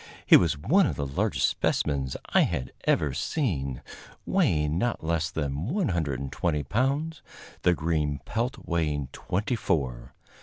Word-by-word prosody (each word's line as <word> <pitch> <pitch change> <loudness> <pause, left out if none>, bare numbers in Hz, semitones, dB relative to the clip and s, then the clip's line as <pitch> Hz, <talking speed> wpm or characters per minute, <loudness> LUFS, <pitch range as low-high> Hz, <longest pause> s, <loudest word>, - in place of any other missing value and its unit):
He - - +8
was 80 -4 +4
one 165 - +3
of - - -2
the 70 - -2
largest 70 - +1
specimens 70 -3 0 0.2
I - - +6
had 65 - -1
ever 75 -3 +2
seen, 70 - -2 0.4
weighing 75 +1 +2
not 120 -3 -1
less 80 +1 0
than 75 0 -3
120 80 - -1
pounds, 140 - -1 0.4
the 90 - +4
green 75 -3 0
pelt 120 +4 -2
weighing 75 -5 -1
twenty 105 +6 -2
four. 65 - -2
80 Hz, 130 wpm, -27 LUFS, 70-110 Hz, 0.4 s, He